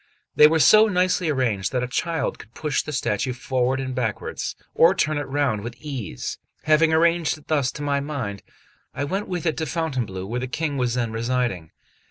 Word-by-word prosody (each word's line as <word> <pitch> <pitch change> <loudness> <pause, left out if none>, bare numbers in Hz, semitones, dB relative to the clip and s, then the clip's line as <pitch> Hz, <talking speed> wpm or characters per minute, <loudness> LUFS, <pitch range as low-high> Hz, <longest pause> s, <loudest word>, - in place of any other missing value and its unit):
They 150 - +9
were 160 +1 +2
so 215 +8 +7
nicely 180 -3 +1
arranged 115 -10 0
that 125 -1 0
a - - -2
child 160 +4 -2
could 110 - -14
push 150 -3 0
the 150 - -7
statue 125 -2 -1
forward 130 +1 0
and 130 -1 -3
backwards, 120 -4 -3 0.2
or 170 +4 +5
turn 155 -3 +1
it 145 - -4
round 135 -6 0
with 120 +3 -7
ease. 130 - -5 0.2
Having 155 +1 +4
arranged 165 0 +2
it 150 - -20
thus 140 -5 +1
to 150 - -6
my 140 -1 +1
mind, 135 -9 -4 0.5
I 140 - -2
went 195 +8 -2
with 180 -2 -3
it 160 - 0
to 160 - -2
Fountainebleau, 125 - -2
where 120 +5 -3
the 130 - -3
King 145 +2 -2
was 125 -2 0
then 120 -3 -1
residing. 115 -7 -1
140 Hz, 200 wpm, -23 LUFS, 120-160 Hz, 0.5 s, They